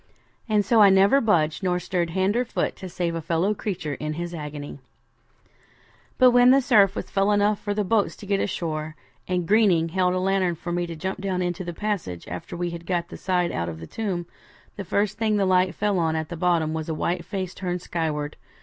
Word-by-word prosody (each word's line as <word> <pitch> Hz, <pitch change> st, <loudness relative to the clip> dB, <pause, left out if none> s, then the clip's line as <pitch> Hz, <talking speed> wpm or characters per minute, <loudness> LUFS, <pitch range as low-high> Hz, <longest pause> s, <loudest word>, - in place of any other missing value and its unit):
And 210 Hz, -2 st, +2 dB
so 225 Hz, +2 st, +4 dB
I 200 Hz, -, +8 dB
never 195 Hz, +8 st, +5 dB
budged, 160 Hz, -8 st, +2 dB
nor 180 Hz, -2 st, +1 dB
stirred 175 Hz, -1 st, -1 dB
hand 190 Hz, +4 st, 0 dB
or 245 Hz, -, +2 dB
foot 245 Hz, -, -2 dB
to 185 Hz, -, -7 dB
save 170 Hz, -1 st, -2 dB
a 165 Hz, -, -3 dB
fellow 165 Hz, +5 st, +1 dB
creature 180 Hz, -8 st, -4 dB
in 150 Hz, +3 st, -4 dB
his 170 Hz, +2 st, -5 dB
agony. 150 Hz, -2 st, -7 dB, 1.4 s
'But 255 Hz, -1 st, +6 dB
when 245 Hz, 0 st, +6 dB
the 270 Hz, +2 st, +7 dB
surf 210 Hz, -7 st, +4 dB
fell 195 Hz, +1 st, +1 dB
enough 205 Hz, 0 st, +2 dB
for 205 Hz, -1 st, -3 dB
the 210 Hz, -, +1 dB
boats 205 Hz, +1 st, +1 dB
to -, -, -11 dB
get 200 Hz, 0 st, 0 dB
ashore, 155 Hz, -4 st, -3 dB, 0.3 s
and 180 Hz, -2 st, -1 dB
Greening 190 Hz, -6 st, +4 dB
held 180 Hz, +1 st, +1 dB
a -, -, 0 dB
lantern 185 Hz, -2 st, +1 dB
for 175 Hz, +2 st, -6 dB
me 175 Hz, 0 st, -1 dB
to 170 Hz, -, -6 dB
jump 190 Hz, +4 st, -4 dB
down 185 Hz, -2 st, -1 dB
into 175 Hz, +1 st, -2 dB
the 175 Hz, -, -4 dB
passage, 175 Hz, -, -4 dB
after 90 Hz, -, -7 dB
we 175 Hz, 0 st, -2 dB
had 170 Hz, 0 st, -8 dB
got 175 Hz, -2 st, -1 dB
the -, -, -8 dB
side 180 Hz, -2 st, 0 dB
out 85 Hz, 0 st, -2 dB
of 80 Hz, -1 st, -7 dB
the 80 Hz, -, -8 dB
tomb, 185 Hz, -, -3 dB, 0.5 s
the 200 Hz, -, -5 dB
first 200 Hz, +3 st, -1 dB
thing 215 Hz, -2 st, +2 dB
the 200 Hz, -, +2 dB
light 185 Hz, 0 st, +2 dB
fell 205 Hz, -3 st, 0 dB
on 160 Hz, -1 st, +1 dB
at 160 Hz, -1 st, -3 dB
the 175 Hz, -, -5 dB
bottom 165 Hz, -2 st, +1 dB
was 160 Hz, 0 st, -4 dB
a 160 Hz, -, -1 dB
white 170 Hz, +2 st, -1 dB
face 185 Hz, 0 st, -4 dB
turned 180 Hz, -2 st, -4 dB
skyward. 150 Hz, -3 st, -3 dB
180 Hz, 220 wpm, -24 LUFS, 165-200 Hz, 1.4 s, I